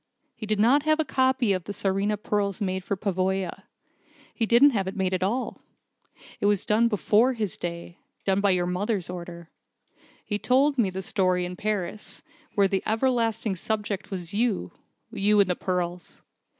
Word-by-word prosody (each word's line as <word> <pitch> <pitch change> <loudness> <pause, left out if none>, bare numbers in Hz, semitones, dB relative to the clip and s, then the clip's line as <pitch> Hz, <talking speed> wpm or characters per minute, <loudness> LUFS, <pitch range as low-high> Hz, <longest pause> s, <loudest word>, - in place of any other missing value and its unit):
He 215 - -7
did 210 -1 0
not 250 +7 +5
have 310 +1 +2
the 315 - 0
copy 260 -5 +2
of 185 -3 -3
the 205 - -5
Tsarina 200 +2 0
pearls 205 -1 -1
made 190 -2 -2
for 200 - -2
Pavoya. 190 -2 -2 0.7
He 225 - -1
didn't 250 +6 +6
have 195 -6 -1
it 190 - -4
made 190 -1 0
at 185 - -1
all. 225 +8 -2 0.8
It 205 - +1
was 205 -2 +2
done 220 +2 +3
before 225 +3 +3
his 215 -6 -3
day 170 0 -6 0.3
done 195 0 +2
by 200 -1 +3
his 175 -1 0
mother's 185 +1 -2
order. 170 -2 -8 0.7
He 205 -1 -2
told 270 +3 +2
me 210 -5 +3
the 190 +1 -5
story 185 -2 +1
in 180 +1 -6
Paris, 210 0 -3 0.3
where 200 -1 +4
the 195 0 0
everlasting 225 -3 0
subject 210 0 -3
was 180 -2 -5
you 210 - 0 0.4
you 205 +1 +2
and 200 - +5
the - - 0
pearls. 180 -1 -4
200 Hz, 175 wpm, -26 LUFS, 185-220 Hz, 0.8 s, didn't